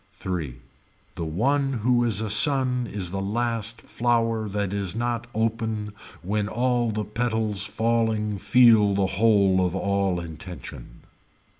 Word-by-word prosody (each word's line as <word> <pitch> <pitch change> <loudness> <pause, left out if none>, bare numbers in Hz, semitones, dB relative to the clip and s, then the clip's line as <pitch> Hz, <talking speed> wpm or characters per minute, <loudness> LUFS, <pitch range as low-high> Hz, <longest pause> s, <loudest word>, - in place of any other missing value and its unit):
Three. 90 -9 -4 0.6
The 85 - -5
one 135 - 0
who 120 +1 +1
is 110 -2 0
a 110 - -3
sun 125 0 +3
is 95 -4 -3
the 95 0 -3
last 115 +2 -2
flower 115 -2 0
that 100 -1 -2
is 100 -1 -2
not 120 0 -2
open 110 -1 -2 0.3
when 105 +3 -1
all 120 +1 0
the 105 -1 -3
petals 110 -2 -1
falling 110 -1 0
feel 110 -3 +5
the 100 -1 +2
whole 100 -2 +3
of 90 0 -1
all 100 -2 0
intention. 85 -6 -9
110 Hz, 135 wpm, -24 LUFS, 100-115 Hz, 0.6 s, feel